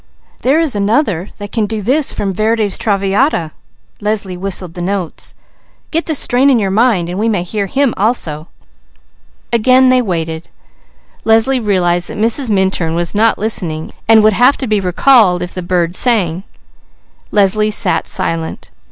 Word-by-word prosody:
"There 275 +5 +2
is 320 -8 +1
another 205 - 0
that 205 -1 -8
can 220 -3 -1
do 220 +1 -3
this 265 +8 +1
from 195 -1 -3
Verdi's 215 0 0
Traviata." 200 - 0 0.5
Leslie 205 -3 -2
whistled 180 -2 -3
the 175 - -7
notes. 185 -2 -4 0.6
"We 230 - +1
may 200 -5 -1
hear 200 +2 -3
him 270 +4 0
also." 175 -8 -1 1.1
Again 255 +3 +4
they 255 0 +3
waited. 165 -6 -4 0.7
Leslie 225 +4 +2
realized 180 -5 0
that - - -7
Mrs. 230 +4 +1
Minturn 190 -5 0
was 170 0 -1
not 220 +2 +2
listening, 170 -7 -1 0.2
and 220 -1 +5
would 215 0 +4
have 250 +7 +3
to 265 - -3
be 215 -3 0
recalled 185 0 +3
if 175 - -7
the 185 - -5
bird 175 -1 -1
sang. 190 -7 +2 0.8
Leslie 210 +1 +2
sat 210 -3 -1
silent. 165 -3 -4
205 Hz, 135 wpm, -14 LUFS, 180-230 Hz, 1.1 s, and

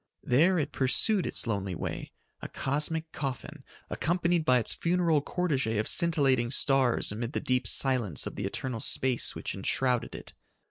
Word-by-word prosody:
There 165 +9 +3
it 150 -2 -2
pursued 175 - +3
its - - -3
lonely 100 -5 -3
way, - - -5 0.3
a - - -5
cosmic 155 +4 -2
coffin, 135 -4 -6 0.2
accompanied 170 0 0
by 130 -4 +4
its 115 - -2
funeral 170 -3 +1
cortege 140 - -1
of 105 - -1
scintillating 135 -8 +2
stars 135 -3 +2
amid 115 +5 -5
the - - -1
deep 125 0 0
silence 125 - +1
of - - -6
the 100 - -4
eternal 120 +3 -5
space 130 +1 +1
which - - -5
enshrouded 125 -3 -1
it. - - -10
135 Hz, 155 wpm, -28 LUFS, 120-160 Hz, 0.3 s, by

